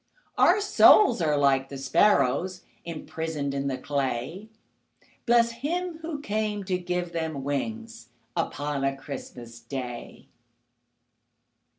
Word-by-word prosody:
Our 385 Hz, +4 st, +4 dB
souls 410 Hz, -, +6 dB
are 150 Hz, -2 st, +2 dB
like 135 Hz, -1 st, +2 dB
the 140 Hz, -, -7 dB
sparrows 175 Hz, +4 st, +2 dB, 0.2 s
Imprisoned 160 Hz, -3 st, -4 dB
in 140 Hz, 0 st, -2 dB
the 130 Hz, -2 st, -2 dB
clay, 140 Hz, -, -3 dB, 0.8 s
Bless 235 Hz, 0 st, +4 dB
Him 325 Hz, +8 st, -3 dB
who 320 Hz, -3 st, -5 dB
came 210 Hz, -3 st, -2 dB
to 185 Hz, -1 st, -1 dB
give 180 Hz, -1 st, -3 dB
them 160 Hz, -4 st, -3 dB
wings 225 Hz, -, -4 dB, 0.3 s
Upon 145 Hz, -1 st, -2 dB
a 135 Hz, 0 st, 0 dB
Christmas 120 Hz, -4 st, -9 dB
Day! 120 Hz, 0 st, -7 dB
160 Hz, 110 wpm, -26 LUFS, 135-220 Hz, 0.8 s, souls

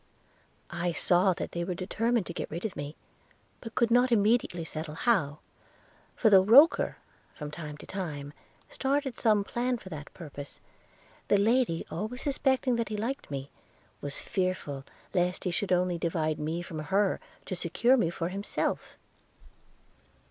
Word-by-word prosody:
'I 175 Hz, 0 st, -1 dB
saw 180 Hz, +3 st, +4 dB
that -, -, -5 dB
they 170 Hz, -, -2 dB
were 180 Hz, 0 st, -3 dB
determined 225 Hz, +4 st, 0 dB
to 170 Hz, -, -6 dB
get -, -, -4 dB
rid 170 Hz, +6 st, -5 dB
of 210 Hz, -, -3 dB
me, 145 Hz, +2 st, -5 dB, 0.6 s
but 225 Hz, -2 st, -9 dB
could 235 Hz, -2 st, +2 dB
not 245 Hz, +1 st, +5 dB
immediately 210 Hz, -5 st, +2 dB
settle 155 Hz, -1 st, -5 dB
how; 165 Hz, -, +1 dB, 0.8 s
for 220 Hz, -, +3 dB
though 190 Hz, -2 st, +9 dB
Roker, 260 Hz, -, +6 dB, 0.4 s
from 150 Hz, -1 st, -6 dB
time 150 Hz, -2 st, -7 dB
to -, -, -11 dB
time, 150 Hz, -7 st, -5 dB, 0.3 s
started 270 Hz, -1 st, -1 dB
some 215 Hz, -3 st, +3 dB
plan 245 Hz, +4 st, -1 dB
for 190 Hz, -, -11 dB
that 150 Hz, -3 st, -8 dB
purpose, 145 Hz, -4 st, -9 dB, 0.7 s
the 205 Hz, -, +4 dB
lady, 220 Hz, -4 st, +2 dB
always 220 Hz, +9 st, -4 dB
suspecting 265 Hz, -3 st, +1 dB
that 230 Hz, -2 st, -1 dB
he 215 Hz, -, -3 dB
liked 240 Hz, +6 st, -3 dB
me, 140 Hz, -1 st, -5 dB, 0.5 s
was 145 Hz, 0 st, -3 dB
fearful 185 Hz, -8 st, -2 dB, 0.3 s
lest 180 Hz, 0 st, +1 dB
he 180 Hz, -, 0 dB
should 185 Hz, +3 st, -2 dB
only 180 Hz, -1 st, +2 dB
divide 160 Hz, -2 st, 0 dB
me 160 Hz, +3 st, -2 dB
from 165 Hz, -3 st, -6 dB
her, 195 Hz, +6 st, +1 dB, 0.3 s
to 185 Hz, -, -3 dB
secure 185 Hz, +9 st, +3 dB
me 205 Hz, -10 st, +2 dB
to 170 Hz, -, -5 dB
himself.' 195 Hz, +3 st, -2 dB
185 Hz, 155 wpm, -29 LUFS, 165-230 Hz, 0.8 s, though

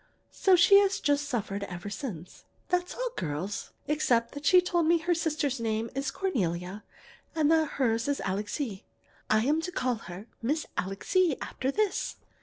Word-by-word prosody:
So 380 Hz, -2 st, +4 dB
she 395 Hz, +3 st, +7 dB
has 400 Hz, -1 st, +2 dB
just 290 Hz, 0 st, +1 dB
suffered 205 Hz, -5 st, -2 dB
ever 180 Hz, +2 st, -7 dB
since. 190 Hz, -, -7 dB, 0.2 s
"That's 360 Hz, 0 st, 0 dB
all, -, -, -2 dB
girls, 160 Hz, +7 st, -3 dB
except 245 Hz, -6 st, +1 dB
that 285 Hz, 0 st, -4 dB
she 365 Hz, -, +8 dB
told 350 Hz, -2 st, +1 dB
me 340 Hz, +1 st, +5 dB
her 340 Hz, +2 st, 0 dB
sister's 305 Hz, -5 st, -1 dB
name 225 Hz, 0 st, -1 dB
is 275 Hz, +1 st, -2 dB
Cornelia 190 Hz, -, -2 dB, 0.5 s
and 310 Hz, -1 st, +3 dB
that 320 Hz, -2 st, +2 dB
hers 230 Hz, -3 st, +1 dB
is 285 Hz, -1 st, 0 dB
Alixe. 205 Hz, +2 st, -3 dB, 0.5 s
I'm 260 Hz, +9 st, +3 dB
to 360 Hz, +2 st, -4 dB
call 250 Hz, -7 st, 0 dB
her 180 Hz, +4 st, -8 dB, 0.2 s
Miss 295 Hz, +7 st, 0 dB
Alixe 280 Hz, -, +1 dB
after 260 Hz, -, -3 dB
this. 420 Hz, +6 st, 0 dB
275 Hz, 160 wpm, -29 LUFS, 210-330 Hz, 0.5 s, she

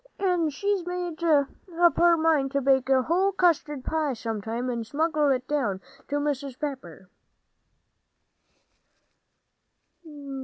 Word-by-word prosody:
And 355 Hz, -5 st, +1 dB
she 400 Hz, +6 st, -1 dB
made 355 Hz, -2 st, -5 dB
up 330 Hz, +3 st, +2 dB
her 345 Hz, -1 st, +5 dB
mind 310 Hz, -4 st, +1 dB
to 280 Hz, -, +1 dB
bake 265 Hz, -1 st, +2 dB
a 260 Hz, -1 st, +4 dB
whole 370 Hz, +6 st, +1 dB
custard 320 Hz, -7 st, +1 dB
pie, 310 Hz, -3 st, -1 dB
sometime, 225 Hz, +1 st, -4 dB
and 235 Hz, -2 st, -2 dB
smuggle 300 Hz, +4 st, 0 dB
it 255 Hz, -1 st, 0 dB
down 250 Hz, -10 st, -1 dB, 0.3 s
to 290 Hz, -, -3 dB
Mrs. 280 Hz, -3 st, -2 dB
Pepper. 225 Hz, -, -6 dB
290 Hz, 115 wpm, -26 LUFS, 260-335 Hz, 0.3 s, her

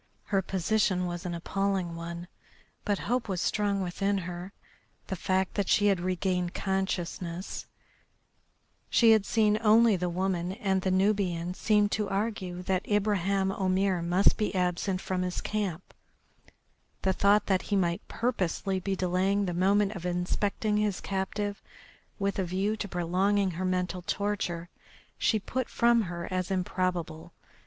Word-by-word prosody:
Her 195 Hz, -2 st, +1 dB
position 190 Hz, 0 st, +1 dB
was 175 Hz, +1 st, -4 dB
an 175 Hz, -, -3 dB
appalling 190 Hz, 0 st, -1 dB
one, 170 Hz, +1 st, -6 dB, 0.6 s
but 205 Hz, -2 st, +1 dB
hope 245 Hz, -3 st, 0 dB
was 185 Hz, -2 st, -1 dB
strong 200 Hz, +1 st, 0 dB
within 195 Hz, +3 st, 0 dB
her. 180 Hz, +1 st, -5 dB, 0.5 s
The 190 Hz, -, -3 dB
fact 190 Hz, +1 st, 0 dB
that 200 Hz, -3 st, -1 dB
since -, -, +5 dB
she 205 Hz, -, +3 dB
had 195 Hz, -3 st, +2 dB
regained 180 Hz, 0 st, -1 dB
consciousness 185 Hz, -2 st, -3 dB, 1.2 s
she 230 Hz, -2 st, +6 dB
had 220 Hz, -3 st, +4 dB
seen 215 Hz, -1 st, +3 dB
only 225 Hz, 0 st, +6 dB
the 180 Hz, -1 st, -1 dB
woman 180 Hz, 0 st, -1 dB
and 195 Hz, -3 st, 0 dB
the 190 Hz, -, 0 dB
Nubian 185 Hz, -3 st, +1 dB
seemed 210 Hz, +1 st, +2 dB
to 210 Hz, -2 st, -1 dB
argue 195 Hz, -3 st, -2 dB
that 185 Hz, 0 st, 0 dB
Ibraheim 200 Hz, -2 st, +1 dB
Omair 190 Hz, -1 st, +1 dB
must 175 Hz, +3 st, +3 dB
be 210 Hz, -2 st, -1 dB
absent 180 Hz, +1 st, 0 dB
from 185 Hz, -1 st, -2 dB
his 180 Hz, 0 st, -2 dB
camp; 195 Hz, -5 st, -3 dB, 1.1 s
the 190 Hz, -, +2 dB
thought 200 Hz, +2 st, +4 dB
that 190 Hz, -2 st, +2 dB
he 205 Hz, -, +2 dB
might 175 Hz, -3 st, +1 dB
purposely 195 Hz, -4 st, -1 dB
be 195 Hz, +1 st, -2 dB
delaying 190 Hz, +2 st, +1 dB
the 180 Hz, -, -2 dB
moment 195 Hz, +3 st, +3 dB
of 190 Hz, -6 st, -7 dB
inspecting 195 Hz, +4 st, 0 dB
his 210 Hz, -3 st, 0 dB
captive 200 Hz, +1 st, -3 dB, 0.6 s
with 200 Hz, -1 st, -1 dB
a -, -, +2 dB
view 190 Hz, +4 st, 0 dB
to 205 Hz, -, -3 dB
prolonging 190 Hz, +3 st, +1 dB
her 180 Hz, +2 st, -3 dB
mental 180 Hz, 0 st, -1 dB
torture 180 Hz, -3 st, -2 dB, 0.5 s
she 220 Hz, -, +3 dB
put 245 Hz, +4 st, -3 dB
from 235 Hz, 0 st, +4 dB
her 170 Hz, -1 st, -5 dB
as 185 Hz, -1 st, -1 dB
improbable. 180 Hz, -3 st, -2 dB
190 Hz, 150 wpm, -29 LUFS, 180-205 Hz, 1.2 s, she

